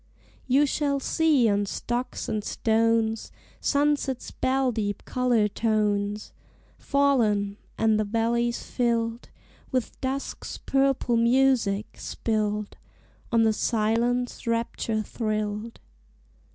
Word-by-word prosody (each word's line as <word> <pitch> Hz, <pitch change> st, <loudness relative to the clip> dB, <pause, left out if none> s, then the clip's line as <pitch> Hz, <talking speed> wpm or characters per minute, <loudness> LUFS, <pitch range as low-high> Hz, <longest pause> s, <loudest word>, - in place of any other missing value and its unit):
You 270 Hz, +3 st, +4 dB
shall 280 Hz, 0 st, 0 dB
see 295 Hz, -4 st, +3 dB
on 205 Hz, -1 st, +1 dB
stocks 245 Hz, +5 st, -3 dB
and 215 Hz, -2 st, -2 dB
stones 225 Hz, 0 st, +1 dB, 0.3 s
Sunset's 285 Hz, -3 st, 0 dB
bell 260 Hz, 0 st, +1 dB
deep 205 Hz, -3 st, -3 dB
color 245 Hz, -4 st, +2 dB
tones 210 Hz, -1 st, -1 dB, 0.5 s
Fallen; 220 Hz, -8 st, +2 dB, 0.2 s
and 220 Hz, -1 st, +3 dB
the -, -, +2 dB
valleys 235 Hz, +2 st, 0 dB
filled 235 Hz, -1 st, -1 dB, 0.4 s
With 255 Hz, -2 st, -2 dB
dusk's 270 Hz, +1 st, -4 dB
purple 270 Hz, -3 st, +1 dB
music, 235 Hz, -4 st, +2 dB
spilled 210 Hz, -2 st, -2 dB, 0.5 s
On 230 Hz, -1 st, +4 dB
the 220 Hz, -1 st, +3 dB
silence 235 Hz, +3 st, 0 dB
rapture 230 Hz, -1 st, -1 dB
thrilled. 215 Hz, 0 st, -3 dB
230 Hz, 100 wpm, -26 LUFS, 215-255 Hz, 0.5 s, You